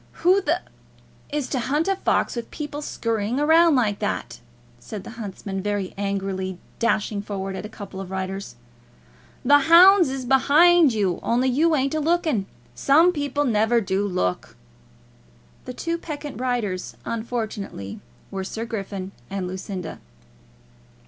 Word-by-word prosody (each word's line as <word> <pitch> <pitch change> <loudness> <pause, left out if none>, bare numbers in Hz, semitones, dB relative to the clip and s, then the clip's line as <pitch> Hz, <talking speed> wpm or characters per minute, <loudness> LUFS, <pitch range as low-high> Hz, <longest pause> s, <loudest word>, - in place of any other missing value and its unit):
"Who 375 +3 +6
the - - 0 0.7
is 295 -3 -2
to 260 - -1
hunt 290 +8 0
a 390 - +2
fox 380 - 0
with 235 -1 -5
people 295 -1 -6
scurrying 230 -3 -2
about 320 +1 +5
like 215 -6 +1
that!" 125 - -3 0.4
said 200 - -8
the - - -9
huntsman, 200 -3 -6
very 205 -2 -2
angrily, 195 -2 -3 0.2
dashing 215 -3 0
forward 195 -2 -4
at 210 - -5
a - - -17
couple 200 -3 -8
of 190 - -8
riders. 190 -5 -4 0.9
"The 290 +3 +7
hounds 345 +3 +7
is 265 -1 -4
behind 300 +5 +5
you, 200 -5 0
only 250 +3 +1
you 310 +6 +3
ain't 275 0 0
a 315 - 0
looking. 310 - +1 0.3
Some 320 - +4
people 290 -1 -1
never 225 0 +3
do 195 -2 -1
look!" 90 - -2 1.1
The 250 - -6
two 335 +3 -2
peccant 295 -4 -6
riders 230 -8 -2
unfortunately 220 - -4 0.3
were 190 -1 -3
Sir 220 +4 -5
Griffin 195 -4 -5 0.2
and 195 -2 -3
Lucinda. 185 -2 -6
230 Hz, 140 wpm, -23 LUFS, 195-290 Hz, 1.1 s, The